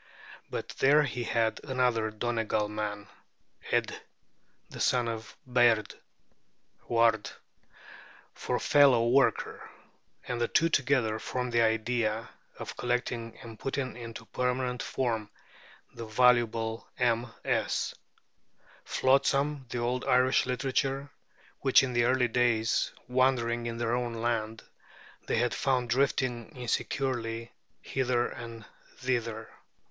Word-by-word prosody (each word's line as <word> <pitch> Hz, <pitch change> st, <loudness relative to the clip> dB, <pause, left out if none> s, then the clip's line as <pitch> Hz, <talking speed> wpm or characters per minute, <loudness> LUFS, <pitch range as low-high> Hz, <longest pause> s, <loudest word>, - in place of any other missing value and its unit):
But -, -, -5 dB
there 145 Hz, +3 st, +5 dB
he 125 Hz, -3 st, -3 dB
had 115 Hz, -1 st, 0 dB
another 125 Hz, -4 st, +1 dB
Donegal 110 Hz, -1 st, -1 dB
man, 105 Hz, -1 st, -4 dB, 0.6 s
Ædh -, -, +1 dB, 0.7 s
the -, -, -10 dB
son 125 Hz, -2 st, +2 dB
of 115 Hz, -1 st, -6 dB
Bháird 120 Hz, -4 st, +3 dB, 0.9 s
(Ward), 115 Hz, -2 st, +3 dB, 1.0 s
for -, -, -2 dB
fellow 135 Hz, -5 st, +5 dB
worker; 135 Hz, +2 st, +1 dB, 0.6 s
and 120 Hz, -1 st, -2 dB
the 120 Hz, -, +2 dB
two 165 Hz, +7 st, +3 dB
together 125 Hz, -7 st, +1 dB
formed 125 Hz, +1 st, -3 dB
the 120 Hz, -, +4 dB
idea 115 Hz, 0 st, 0 dB, 0.3 s
of -, -, -7 dB
collecting 120 Hz, -2 st, -2 dB
and 115 Hz, -2 st, -10 dB
putting 135 Hz, -1 st, -3 dB
into 115 Hz, -1 st, -8 dB
permanent 125 Hz, +1 st, -1 dB
form 115 Hz, -5 st, -2 dB, 0.6 s
the 115 Hz, -, -7 dB
valuable 115 Hz, -1 st, +2 dB
MS. 120 Hz, -1 st, 0 dB, 0.9 s
flotsam 140 Hz, +1 st, +1 dB
of 120 Hz, -, -2 dB
old 125 Hz, +2 st, -1 dB
Irish 130 Hz, +1 st, +3 dB
literature 135 Hz, +2 st, -1 dB, 0.5 s
which 135 Hz, 0 st, +5 dB
in 125 Hz, -2 st, -2 dB
earlier 125 Hz, +1 st, +3 dB
days, 115 Hz, -1 st, +1 dB, 0.2 s
wandering 120 Hz, -2 st, +1 dB
in 115 Hz, 0 st, -4 dB
their 120 Hz, 0 st, -1 dB
own 120 Hz, -1 st, -1 dB
land, 115 Hz, -1 st, -2 dB, 0.6 s
they -, -, +1 dB
had 120 Hz, +1 st, +1 dB
found 125 Hz, -3 st, 0 dB
drifting 130 Hz, -3 st, 0 dB
insecurely 120 Hz, -1 st, -2 dB, 0.3 s
hither 125 Hz, -2 st, 0 dB
and 115 Hz, -2 st, -9 dB, 0.3 s
thither. 115 Hz, -3 st, -2 dB
120 Hz, 110 wpm, -29 LUFS, 115-130 Hz, 1.0 s, there